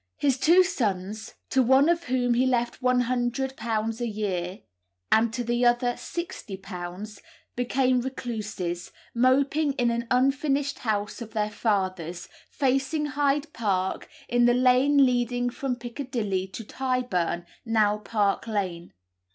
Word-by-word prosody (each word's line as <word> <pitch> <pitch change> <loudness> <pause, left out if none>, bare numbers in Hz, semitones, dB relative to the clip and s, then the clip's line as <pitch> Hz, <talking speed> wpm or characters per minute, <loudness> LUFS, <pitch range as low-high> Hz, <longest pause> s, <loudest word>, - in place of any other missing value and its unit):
His 270 -3 +1
two 350 +6 +6
sons 215 - -3 0.2
(to 265 - +4
one 265 +4 +5
of 340 0 +1
whom 250 -1 +1
he 250 +2 +2
left 240 0 0
£100 245 -2 0
a 240 - 0
year, 195 -4 -3 0.5
and 225 +1 +4
to 245 +2 -3
the 240 +1 0
other 245 0 +3
£60) 195 - -7 0.4
became 250 +1 +1
recluses, 215 -9 -4 0.2
moping 275 +4 +2
in 245 -3 +1
an 235 0 -2
unfinished 275 +2 +1
house 210 0 -2
of 220 -2 -8
their 210 -1 -1
father's, 185 -6 -1 0.2
facing 275 +3 0
Hyde 290 +1 0
Park, 190 -4 -1 0.2
in 240 0 +3
the 240 0 +4
lane 260 +3 +5
leading 245 -1 0
from 260 0 -2
Piccadilly 235 -6 -3
to 210 +4 -8
Tyburn, 220 -9 -1 0.2
now 215 -2 +2
Park 210 -1 0
Lane. 185 -6 -3
240 Hz, 125 wpm, -26 LUFS, 210-260 Hz, 0.5 s, two